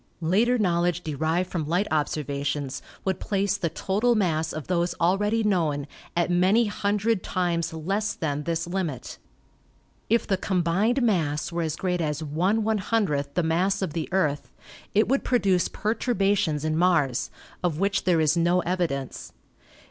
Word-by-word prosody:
Later 220 +9 +3
knowledge 175 -3 +1
derived 160 +4 -1
from 160 -4 -2
light 175 +5 +1
observations 145 -2 -2 0.2
would 190 -2 0
place 200 -1 0
the 170 -4 -1
total 215 +9 +1
mass 160 -6 0
of 155 - -5
those 175 -1 0
already 205 +6 +2
known 160 -9 +1 0.3
at 175 0 +2
many 190 +7 +4
hundred 210 0 0
times 175 -2 -1
less 195 +7 -2
than 145 -2 -2
this 165 +2 -2
limit. 170 -8 -4 0.9
If 230 +2 +3
the 195 - +1
combined 190 +8 +1
mass 155 -9 0
were 170 0 -2
as 160 -1 -1
great 180 -2 -1
as 150 0 -2
Vioo 190 -2 0
the 180 - +2
mass 185 +5 +1
of 170 -6 -3
the 160 -2 -3
Earth, 155 -7 0 0.5
it 215 - +4
would 275 +2 +1
produce 195 -8 +2
perturbations 200 - 0
in 155 0 0
Mars 160 -7 +2 0.3
of 170 -4 0
which 195 +1 0
there 175 -3 +3
is 155 +1 +3
no 175 +2 +3
evidence. 170 -8 -3
175 Hz, 150 wpm, -25 LUFS, 155-200 Hz, 0.9 s, many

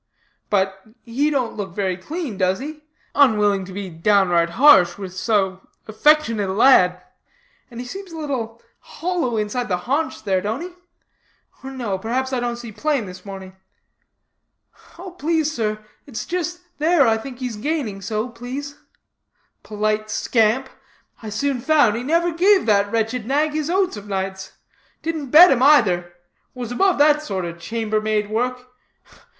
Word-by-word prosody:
'But, 195 -1 0 0.2
he 265 +6 0
don't 260 -6 -1
look 190 -4 -6
very 190 -3 -1
clean, 290 - -5
does 185 0 +1
he?' 300 +3 -8 0.3
unwilling 210 -8 +3
to 190 - -10
be 195 +1 -5
downright 175 -1 +2
harsh 205 -11 +6
with 190 -2 -7
so 190 -2 -1 0.2
affectionate 225 -3 +2
a - - -1
lad; 180 -6 +4 0.7
'and 235 -2 -10
he 250 - -5
seems 385 +7 -8
a 325 - -8
little 245 -7 -4 0.2
hollow 335 -10 -3
inside 215 +4 -2
the 180 - 0
haunch 290 +2 -1
there, 190 -3 0
don't 220 - -3
he? 355 - -6 0.9
or 265 - -6
no, 235 -8 -4
perhaps 260 +5 -2
I 255 - 0
don't 240 0 -2
see 235 -1 -9
plain 285 0 -1
this 180 -1 -10
morning.' 190 -1 -9 1.4
'Oh, 365 +2 -9
please 320 -2 0
sir, 215 -6 -2 0.3
it's 255 -6 -6
just 350 0 -3 0.2
there 310 -3 +4
I 225 - +3
think 250 +2 -9
he's 250 -3 -4
gaining 225 -5 -3
so, 215 +3 -2
please.' 255 +5 -7 0.8
Polite 215 0 -2
scamp! 225 +4 +1 0.5
I 220 - -7
soon 250 +4 -1
found 290 -7 +3
he 235 - -3
never 335 +6 +1
gave 375 +4 +3
that 205 -2 +2
wretched 225 +1 -1
nag 295 +3 +1
his 305 0 -2
oats 370 - +1
of 205 0 -10
nights; 190 -1 -4 0.5
didn't 315 -4 -3
bed 335 +6 +9
him 255 -2 +2
either. 185 -12 +4 0.4
Was 245 -2 -6
above 375 +9 +2
that 295 +1 +4
sort 195 - -4
of 170 0 -7
chambermaid 215 +1 -1
work. 250 +3 -2
235 Hz, 155 wpm, -21 LUFS, 205-290 Hz, 1.4 s, bed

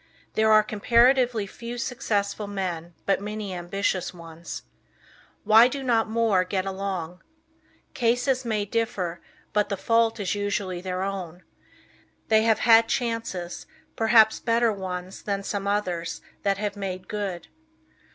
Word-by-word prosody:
There 220 0 +3
are 215 0 +7
comparatively 235 +2 +3
few 235 +4 -8
successful 215 -5 -2
men 175 -4 -4
but 195 0 +1
many 210 -1 -5
ambitious 180 +1 -2
ones. 165 0 -9 0.8
Why 220 +3 +7
do 270 +2 -5
not 230 -3 +2
more 220 -5 +2
get 185 0 -2
along? 190 -3 -4 0.7
Cases 250 +2 +1
may 215 -3 -1
differ, 200 -6 -2 0.3
but 210 0 +1
the 200 - -2
fault 230 +2 +2
is 195 -3 -1
usually 200 -3 -2
their 185 0 -3
own. 185 -3 -5 0.9
They 220 -1 +5
have 225 0 +2
had 230 -1 +6
chances, 225 -8 -3 0.3
perhaps 220 -1 +5
better 230 -1 +2
ones 185 -1 -6
than 200 -1 -2
some 200 0 -3
others 180 -5 -2 0.2
that 195 -1 +1
have 205 0 -3
made 185 -2 -5
good. 195 -5 -4
205 Hz, 130 wpm, -25 LUFS, 185-225 Hz, 0.9 s, are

